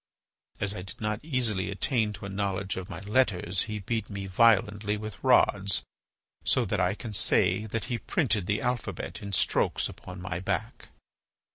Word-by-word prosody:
As 100 0 +2
I 90 - -5
did 95 - -10
not 105 0 -1
easily 115 - +1
attain 110 +2 +1
to 100 - -8
a - - -5
knowledge 100 0 -2
of 95 -1 -6
my 85 +1 -6
letters, 100 -5 +1
he 105 - -2
beat 110 +2 -3
me 100 -1 -5
violently 105 0 +3
with 105 -5 -8
rods 100 0 +4 0.6
so - - +3
that - - -1
I 90 +2 +2
can 110 -1 -7
say 100 +1 +2
that 110 +1 -3
he 120 -2 -2
printed 105 - 0
the 105 +1 +1
alphabet 125 -2 -3
in 100 -1 -6
strokes 95 - +2
upon 90 0 -10
my 90 -1 -4
back." 95 - -3
100 Hz, 170 wpm, -28 LUFS, 95-110 Hz, 0.6 s, rods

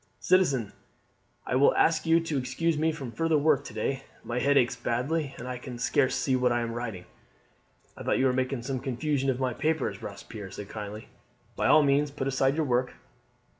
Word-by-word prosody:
"Citizen, 140 - +2 0.7
I 125 - -1
will 135 +2 +5
ask 165 0 +2
you 165 +1 +5
to 160 -4 -2
excuse 155 +6 -1
me 160 +2 +1
from 135 -6 -6
further 165 +3 +1
work 145 -2 +3
to - - -8
day. 135 +5 -1 0.2
My 120 +1 -2
head 140 +2 +3
aches 125 -1 +3
badly, 135 +5 -2
and 125 - -7
I 125 -1 -4
can 125 -1 -8
scarce 130 +2 +1
see 130 - +1
what 125 -1 +2
I 120 0 +1
am 115 0 -3
writing." 115 -7 -5 0.9
"I - - -10
thought - - +1
you 135 - +2
were 130 - +3
making 130 -1 -1
some 130 0 -2
confusion 135 +2 -1
of 130 -1 0
my 130 -2 0
papers," 155 +3 -1
Robespierre 105 -4 -8
said 100 +1 -8
kindly. 105 0 -7 0.5
"By - - +1
all 155 - +6
means 145 +1 +2
put 140 -1 -4
aside 135 0 +2
your 160 -1 0
work." 125 -1 0
130 Hz, 205 wpm, -28 LUFS, 120-150 Hz, 0.9 s, all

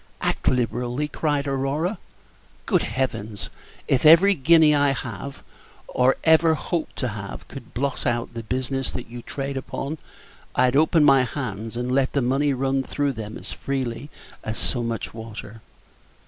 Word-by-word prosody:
"Act - - -1
liberally!" 125 +3 0
cried 145 -1 -1
Aurora; 140 +8 -1 0.7
"good - - +2
Heavens! 110 -6 -3 0.4
if 130 - +2
every 170 +6 +8
guinea 160 0 +5
I 145 -1 +3
have, 130 +1 -6 0.4
or 130 +1 +3
ever 160 0 +5
hope 165 +1 -2
to 130 - -2
have, 100 -2 -7
could 130 -5 -11
blot 135 +2 -1
out 120 0 -1
the 115 - -5
business 130 +3 -2
that 120 -2 -7
you 120 0 -7
trade 140 +2 -4
upon, 140 +3 -4 0.6
I'd 125 0 +3
open 155 +2 +4
my 135 -2 +6
hands 120 -3 -4
and 125 +1 -2
let 135 0 +2
the 140 - +2
money 135 +4 +2
run 135 0 0
through 145 +1 -1
them 110 -2 -6
as - - -9
freely 130 -1 -3 0.3
as 110 0 -4
so 125 - -1
much 115 -2 -3
water." 115 -1 -9
135 Hz, 155 wpm, -24 LUFS, 120-145 Hz, 0.7 s, every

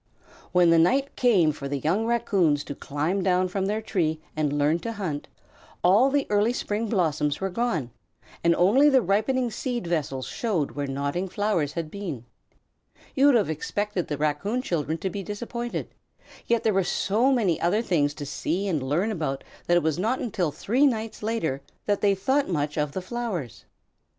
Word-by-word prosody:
When 175 -2 +5
the 165 - +6
night 270 +12 +2
came 195 -11 +4
for 140 -2 -6
the 140 0 -2
young 185 - 0
Raccoons 195 -11 +2
to - - -6
climb 150 +8 -2
down 185 0 +2
from 195 +1 -1
their 215 +2 -1
tree 160 -7 0 0.2
and 155 -2 0
learn 145 +3 +2
to 230 +5 -4
hunt, 175 -9 -4 0.6
all 205 +9 +5
the 280 0 +1
early 210 +3 +3
spring 220 -1 -2
blossoms 155 -7 0
were 195 0 -2
gone, 175 - -1 0.5
and 170 0 +4
only 245 +12 +5
the 265 -4 +4
ripening 235 +6 +1
seed 240 -3 -3
vessels 145 -6 -2
showed 180 - -1
where 145 -1 -3
nodding 145 +7 -2
flowers 175 -8 0
had 165 -2 -4
been. 175 - -6 0.9
You 275 +1 +4
would 285 - +6
have 210 -8 +2
expected 200 +4 -2
the 145 - -3
Raccoon 155 - -1
children 160 - -1
to 190 - -3
be 200 - -4
disappointed, 235 +4 -5 0.5
yet 235 -1 +2
there 220 - +2
were 195 0 +2
so 220 +8 +1
many 210 -11 +1
other 205 +7 +2
things 145 -8 +1
to 145 - -6
see 170 +7 -2
and 160 -7 0
learn 155 +11 0
about 150 -8 -3 0.2
that 175 - +4
it 175 - +1
was 160 +1 0
not 225 +7 +1
until 190 -8 -1
three 240 - +2
nights 225 -3 -3
later 210 -11 -1 0.2
that 205 -1 0
they 200 -1 +3
thought 265 +8 +1
much 150 -4 -1
of 150 -2 -1
the 185 - -4
flowers. 195 - -4
185 Hz, 185 wpm, -26 LUFS, 155-225 Hz, 0.9 s, the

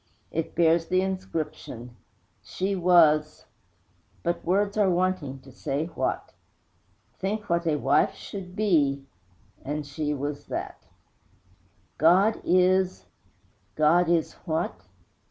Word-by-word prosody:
It 165 0 -3
bears 165 0 +3
the 185 0 +2
inscription: 165 -10 -5 0.5
She 195 +2 -2
was, 165 -4 +4 0.8
But 170 0 -1
words 200 +3 +1
are 205 -3 +3
wanting 175 -7 -1
to 135 - -15
say 140 +4 -3
what! - - -2 0.9
Think 205 0 -3
what 170 0 +1
a 155 - +2
wife 140 -1 +2
should 185 -2 -8
be 145 -10 +2 0.6
And 150 +2 -3
she 150 +1 -3
was 145 +1 -5
that! - - -6 1.1
God 185 +7 +4
is! 185 - +2 0.7
_God 165 +3 +4
is 170 -2 +1
what? 160 0 -1
170 Hz, 110 wpm, -26 LUFS, 150-185 Hz, 1.1 s, was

